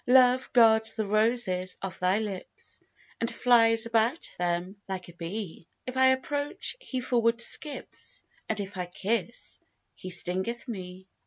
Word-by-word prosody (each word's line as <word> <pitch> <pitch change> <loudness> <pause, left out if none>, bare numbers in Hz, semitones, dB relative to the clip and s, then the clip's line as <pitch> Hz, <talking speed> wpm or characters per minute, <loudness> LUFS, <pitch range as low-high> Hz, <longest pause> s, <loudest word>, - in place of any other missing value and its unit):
Love 255 0 +5
guards 220 -2 +5
the 220 -1 -1
roses 210 -3 +1
of 190 -3 -5
thy 185 +2 +2
lips, 205 -4 -6 0.4
And 230 - +1
flies 230 -2 +4
about 230 +6 +1
them 175 +2 -1
like 185 -2 -5
a - - -12
bee: 170 0 -6 0.2
If 255 - -6
I 260 0 +5
approach, 285 +2 0
he 265 - -4
forward 235 -2 +1
skips, 285 +4 -4 0.3
And 215 - -1
if 200 -1 -5
I 180 -1 -3
kiss, 215 +5 -3 0.3
he 185 - -8
stingeth 190 +7 -1
me. 185 -4 -7
220 Hz, 145 wpm, -28 LUFS, 185-240 Hz, 0.4 s, Love